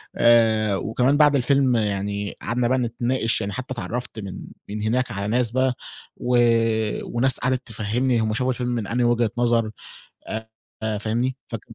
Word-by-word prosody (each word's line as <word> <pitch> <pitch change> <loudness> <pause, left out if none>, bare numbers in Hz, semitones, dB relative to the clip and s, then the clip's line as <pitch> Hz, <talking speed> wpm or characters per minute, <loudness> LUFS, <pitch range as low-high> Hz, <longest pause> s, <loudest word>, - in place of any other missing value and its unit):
آآ 110 -3 +4
وكمان 125 +8 +1
بعد 145 -2 +5
الفيلم 135 -1 +3
يعني 100 -1 -2
قعدنا 120 +1 0
بقى 130 - +2
نتناقش، 120 0 0
يعني 100 0 -3
حتّى 130 +2 -5
اتعرّفت 120 -1 -4
من 100 -3 -7 0.3
من 105 0 -4
هناك 125 +2 0
على 100 0 -3
ناس 120 +1 +1
بقى 130 0 +1 0.4
و 125 0 +1 0.8
وناس 130 +2 +3
قعدِت 130 -1 -1
تفهِّمني 115 +3 0
هم 110 -1 0
شافوا 125 +3 0
الفيلم 125 -1 -2
من 115 -4 -2
أنهى 120 +1 +1
وجهة 120 -2 +2
نظر 115 -2 +2 0.6
آآ، 110 0 -5 0.3
آآ 110 -1 -1
فاهمني، 120 +5 -1
فك 115 -2 -5
120 Hz, 165 wpm, -23 LUFS, 110-125 Hz, 0.8 s, بعد